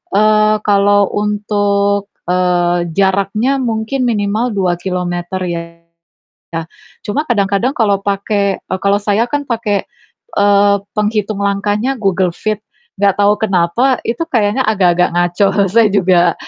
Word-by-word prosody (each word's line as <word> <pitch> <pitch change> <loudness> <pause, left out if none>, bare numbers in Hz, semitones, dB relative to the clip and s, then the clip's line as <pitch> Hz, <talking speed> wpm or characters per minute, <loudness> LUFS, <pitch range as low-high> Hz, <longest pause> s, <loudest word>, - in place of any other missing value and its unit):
eee, 215 +1 +4
kalau 205 -1 +3
untuk, 205 -1 0 0.2
eee, 175 -1 +1
jaraknya 200 +7 +1
mungkin 240 +2 -1
minimal 215 +1 -1
2 180 -3 0
kilometer 180 0 -3
ya. 170 -1 -3 1.5
Cuma 280 +9 -1
kadang-kadang 205 +2 +1
kalau 205 -4 +1
pake 200 0 -1
eee, 185 - -5
kalau 200 0 +2
saya 205 +2 +1
kan 290 +1 -1
pakai, 215 -4 -1 0.5
eee, 200 0 +4 0.2
penghitung 210 -1 -1
langkahnya 205 +6 -1
Google 190 -3 +1
Fit. 215 -1 -3 0.4
Nggak 200 -1 +3
tahu 205 +1 +4
kenapa 220 +6 +1
itu 235 +6 -3
kayaknya 230 -2 +1
agak-agak 180 -4 +2
ngaco. 175 +3 +2 0.2
Saya 225 +1 +4
juga 180 -3 +3
200 Hz, 120 wpm, -15 LUFS, 190-215 Hz, 1.5 s, eee